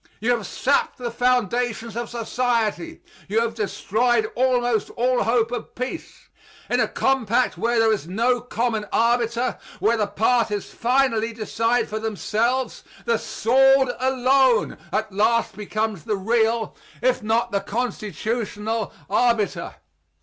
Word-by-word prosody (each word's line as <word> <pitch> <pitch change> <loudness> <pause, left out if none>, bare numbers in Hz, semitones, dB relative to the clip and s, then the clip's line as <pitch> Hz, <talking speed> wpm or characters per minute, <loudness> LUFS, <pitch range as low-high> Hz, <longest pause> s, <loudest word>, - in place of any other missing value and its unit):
You 230 +4 +1
have 230 -6 -1
sapped 280 +2 0
the 240 -2 -4
foundations 240 -2 0
of 235 -1 -4
society; 240 +6 -1 0.2
you 210 +3 +1
have 230 0 0
destroyed 220 +1 0
almost 245 -3 +1
all 250 +1 +1
hope 230 0 +1
of 245 -2 -6
peace. 255 +6 -6 0.4
In - - +2
a - - +3
compact 255 -2 +1
where 235 +1 0
there 225 -1 +4
is 195 -7 -4
no 235 +6 +1
common 230 -3 -2
arbiter, 235 +1 +1 0.2
where 220 +5 +2
the 210 -2 0
parties 210 0 0
finally 235 -2 +1
decide 230 +2 0
for 215 +1 -4
themselves, 225 +4 -1 0.2
the 470 - +1
sword 270 +2 +3
alone 260 -1 +2
at 215 0 -1
last 220 +2 +1
becomes 215 -3 -3
the 210 - -1
real, 225 +2 +1 0.3
if 255 0 +2
not 225 +2 0
the 200 - +1
constitutional, 220 -1 -3 0.2
arbiter. 220 -1 0
230 Hz, 130 wpm, -23 LUFS, 220-245 Hz, 0.4 s, there